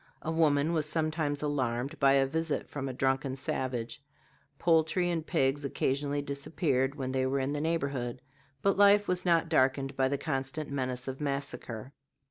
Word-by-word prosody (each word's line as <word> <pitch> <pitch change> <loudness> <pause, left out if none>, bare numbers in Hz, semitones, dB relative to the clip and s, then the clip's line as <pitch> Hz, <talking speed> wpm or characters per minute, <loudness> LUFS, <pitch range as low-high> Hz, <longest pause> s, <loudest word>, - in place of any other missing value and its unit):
A 160 - -2
woman 155 -1 +2
was 155 -2 +1
sometimes 155 -2 -1
alarmed 130 -3 -1
by 135 -1 +5
a 135 -1 +4
visit 160 +2 -2
from 135 -2 -4
a - - -4
drunken 135 +1 0
savage; 130 -2 -3 0.6
poultry 165 +2 +2
and 165 -2 -1
pigs 135 -1 +1
occasionally 140 +1 -1
disappeared 140 -1 -1
when 130 -3 -3
they 130 0 +1
were 135 +1 0
in 135 +2 -1
the 145 - -2
neighborhood; 140 -7 -1 0.4
but 195 -1 +3
life 205 0 +6
was 180 0 0
not 165 -1 +3
darkened 135 -3 +2
by 130 0 +2
the 140 +1 -1
constant 140 +1 -3
menace 130 -2 -2
of 135 +2 -5
massacre. 140 -4 -4
140 Hz, 165 wpm, -30 LUFS, 130-155 Hz, 0.6 s, life